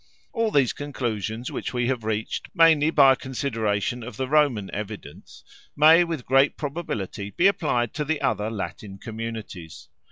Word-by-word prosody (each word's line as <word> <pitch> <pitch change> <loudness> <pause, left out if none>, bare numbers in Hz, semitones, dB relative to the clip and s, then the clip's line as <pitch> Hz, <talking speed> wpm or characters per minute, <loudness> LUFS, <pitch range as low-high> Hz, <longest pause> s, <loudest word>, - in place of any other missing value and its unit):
All 230 -3 +1
these 140 - +2
conclusions, 120 -5 -4
which - - -5
we 120 0 0
have 125 -2 -1
reached 110 0 -3
mainly 160 -3 +5
by 140 -4 +6
a - - -2
consideration 120 -4 -2
of 125 +2 -9
the 130 -1 -2
Roman 135 -9 +2
evidence, 105 0 -8 0.3
may 160 +4 +7
with 165 -7 -5
great 135 +2 +3
probability 125 - -4
be 175 - 0
applied 145 - +1
to 150 - -2
the 155 0 -1
other 105 0 -1
Latin 100 -1 -6
communities. 110 -6 -8
125 Hz, 155 wpm, -24 LUFS, 110-150 Hz, 0.3 s, may